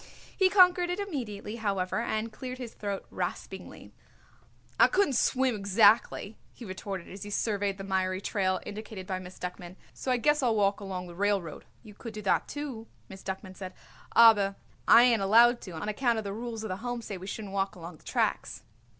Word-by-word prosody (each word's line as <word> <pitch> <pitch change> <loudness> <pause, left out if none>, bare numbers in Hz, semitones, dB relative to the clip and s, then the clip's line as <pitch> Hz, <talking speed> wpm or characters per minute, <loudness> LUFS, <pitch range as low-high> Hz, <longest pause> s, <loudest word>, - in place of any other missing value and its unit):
He 380 -2 +4
conquered 360 -2 +5
it 355 - -1
immediately, 230 - -5
however, 195 -3 -1
and 225 -1 -2
cleared 255 +2 -6
his 245 -3 -7
throat 200 -2 -4
raspingly. - - -6 0.9
"I - - +8
couldn't 380 -8 +2
swim 260 +1 +2
exactly," 205 +1 +3
he 240 - -11
retorted 190 -1 -6
as 195 +1 -10
he 205 - -6
surveyed 205 -2 -1
the 195 - -7
miry 190 -1 0
trail 190 -2 0
indicated 210 -2 -7
by 185 -1 -3
Miss 185 0 -11
Duckman, 180 0 -7 0.2
"so - - -6
I 250 - +3
guess 295 +5 +2
I'll 240 -4 +2
walk 200 -1 +2
along 190 -3 -5
the 175 - -10
railroad." 195 -4 -1 0.2
"You 215 -2 -12
could 220 +1 -9
do 215 - -5
that, 195 - +1
too," 270 -7 -6 0.2
Miss 190 0 -10
Duckman 190 0 -6
said, 185 -1 -8 0.4
"aber 205 -4 +6 0.3
I 235 - +9
ain't 235 -4 +4
allowed 235 +5 +5
to, 185 - -8
on 160 +6 -5
account 225 +1 0
the 200 -1 -4
rules 225 0 -5
of 220 - -4
the 185 - -3
Home 245 +2 -4
says 200 -3 -6
we 185 - -9
shouldn't 205 -1 -6
walk 195 0 -1
along 170 -1 -9
the - - -25
tracks." - - -1
205 Hz, 195 wpm, -29 LUFS, 190-235 Hz, 0.9 s, I